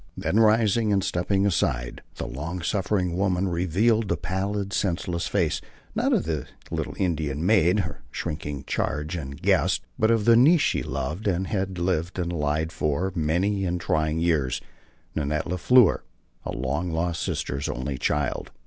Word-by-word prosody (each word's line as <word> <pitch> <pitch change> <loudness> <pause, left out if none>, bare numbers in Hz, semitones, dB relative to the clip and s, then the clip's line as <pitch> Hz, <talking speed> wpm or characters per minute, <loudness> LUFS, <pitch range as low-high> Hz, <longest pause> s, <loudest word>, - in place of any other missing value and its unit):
Then 110 - +1
rising 110 0 +4
and 100 -2 +2
stepping 95 +3 +1
aside, - - 0
the - - -4
long 85 +6 -5
suffering 95 -2 0
woman 95 -1 +1
revealed 95 +6 +2
the 85 - 0
pallid, 100 +3 -2
senseless 90 -2 -1
face, - - 0 0.3
not - - +1
of - - +3
the 80 -4 -2 0.2
little - - -3
Indian 80 -4 -1
maid, 95 -1 +4
her 80 -5 -7
shrinking 75 -4 -4
charge 75 +4 -2
and 70 -3 -6
guest, 95 -1 +2 0.2
but 110 - +3
of 115 -3 +2
the 115 - +7
niece 150 +7 +6
she - - +1
loved 80 +11 -3
and 95 -1 +1
had 95 -2 -2
lived 85 0 -1
and 85 -1 -2
lied 75 0 0
for 80 +5 -1
many 90 +5 0
and 90 -1 -1
trying 80 -1 0
years 80 -7 +1 0.5
Nanette 75 0 -1
La 90 +1 -2
Fleur, 125 +3 +5 0.5
a - - -2
long 75 +8 -2
lost 85 0 -1
sister's 70 +2 -2
only 65 +1 -3
child. 75 +1 -1
90 Hz, 160 wpm, -25 LUFS, 80-100 Hz, 0.5 s, the